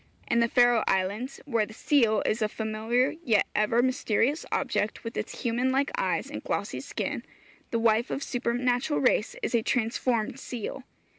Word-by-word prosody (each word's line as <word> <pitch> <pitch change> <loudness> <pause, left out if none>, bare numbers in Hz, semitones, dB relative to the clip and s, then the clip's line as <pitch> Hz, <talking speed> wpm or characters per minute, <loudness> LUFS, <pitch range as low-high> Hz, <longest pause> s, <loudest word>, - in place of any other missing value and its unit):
In 235 - +2
the 235 - +4
Faro 245 -1 +4
Islands, 200 +8 -1
where 230 -7 +1
the 220 - -12
seal 230 -6 +3
is 220 +2 0
a 215 - +1
familiar 220 +4 0
yet 220 -7 +3
ever 220 +3 +2
mysterious 255 +2 +1
object, 210 - -1
with 230 0 -6
its - - -5
human 245 +2 +1
like 275 +2 +1
eyes, - - 0
and - - -7
glossy - - -2
skin, - - -4 0.5
the 230 - 0
wife 230 +1 +2
of 275 - -3
supernatural 245 +3 0
race 245 -4 +2
is - - -1
a 235 - +3
transformed 235 +1 0
seal. 245 +1 -6
235 Hz, 165 wpm, -27 LUFS, 220-255 Hz, 0.5 s, the